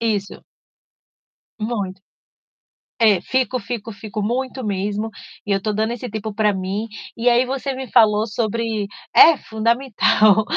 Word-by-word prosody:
Isso. 210 -4 -2 1.2
Muito. 205 -4 -3 1.0
É, 210 -4 +6
fico, 260 +1 0
fico, 225 +1 -5
fico 210 +1 -6
muito 255 +3 -2
mesmo 205 +1 -2 0.4
e 205 - 0
eu 195 -1 0
tô 215 - -1
dando 220 +3 0
esse 245 -1 -7
tempo 215 -1 -5
pra 210 -1 +2
mim. 195 +3 -3 0.3
E 240 +1 +2
aí 245 +2 +3
você 270 +1 -3
me 260 -2 -7
falou 215 -2 +4
sobre 220 -1 -2 0.3
É, 320 -3 +8
fundamental. 220 -2 +2
220 Hz, 135 wpm, -21 LUFS, 205-240 Hz, 1.2 s, É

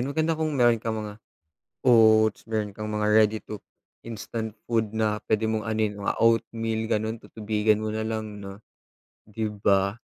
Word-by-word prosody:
maganda 155 +5 0
kung 155 -2 -1
meron 120 -2 +4
kang 110 0 -2
mga 105 +1 -9 0.7
oats, 110 -2 +5
meron 105 -2 -2
kang 105 0 -5
mga 105 0 0
ready 110 0 +4
to 105 - -8 0.5
instant 110 0 -5 0.2
food 110 -3 +1
na 110 -1 0
pwede 110 0 +2
mong 110 -1 -1
anohin, 110 -1 0
mga - - 0
oatmeal 115 -1 +1
ganon 110 +1 0
tutubigan 105 0 0
mo 110 0 -3
nalang 110 -2 -4
no 100 0 -9 0.7
di 110 0 -3
ba 100 0 +1
110 Hz, 155 wpm, -26 LUFS, 105-115 Hz, 0.7 s, oats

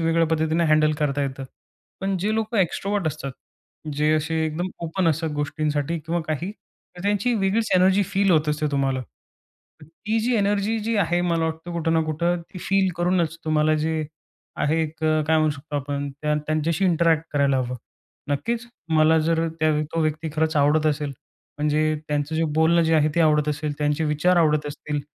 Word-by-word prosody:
वेगळ्या 165 0 +2
पद्धतीने 160 +1 +1
हँडल 155 0 +4
करता 145 -2 0
येतं. 135 -1 -4 0.6
पण 195 0 -1
जे 210 +5 0
लोकं 220 0 -1
एक्स्ट्रव्हर्ट 195 +1 0
असतात. 135 -2 -3 0.6
जे 150 +1 +2
असे 155 +1 -1
एकदम 160 +3 -3 0.2
ओपन 170 +2 0
असतात 160 +1 0
गोष्टींसाठी 145 +2 -1
किंवा 165 +2 -2
काही, 155 +5 -2
तर 180 -4 -18
त्यांची 205 +4 +1
वेगळीच 210 +1 0
एनर्जी 190 +2 +4
फील 195 +1 +1
होत 155 -3 +3
असते 150 0 0
तुम्हाला. 135 -2 0 0.8
ती 165 +9 -3
जी 240 +2 0
एनर्जी 205 +2 +1
जी 225 +2 -1
आहे 175 -3 +1
मला 170 -2 +1
वाटतं 160 +2 -4
कुठं 165 -1 0
ना 165 - +3
कुठं 170 +3 0
ती 185 - -7
फील 195 +1 +1
करूनच 175 -2 +1
तुम्हाला 155 0 +2
जे 155 0 -1 0.5
आहे, 160 +2 +1
एक 155 0 -4
काय 155 0 +2
म्हणू 155 -1 +3
शकतो 145 +1 -6
आपण, 140 0 -3
त्या 150 0 +1
त्यांच्याशी 155 +4 0
इंटरॅक्ट 165 -2 +3
करायला 140 -2 +2
हवं. 125 0 -2 0.5
नक्कीच, 230 +12 -2 0.3
मला 155 +1 +5
जर 165 +1 +1
त्या 155 0 +3 0.2
तो 165 - 0
व्यक्ती 155 +1 -1
खरंच 160 0 0
आवडत 150 +2 +3
असेल. 150 -1 -1 0.5
म्हणजे 150 +1 +1
त्यांचं 150 +1 -1
जे 165 - +1
बोलणं 165 +2 +4
जे 165 0 +2
आहे 155 -1 +4
ते 170 - +2
आवडत 150 -1 +3
असेल, 150 0 -2
त्यांचे 150 +1 0
विचार 155 +4 +2
आवडत 150 -3 +3
असतील. 145 0 -4
160 Hz, 175 wpm, -23 LUFS, 150-175 Hz, 0.8 s, मला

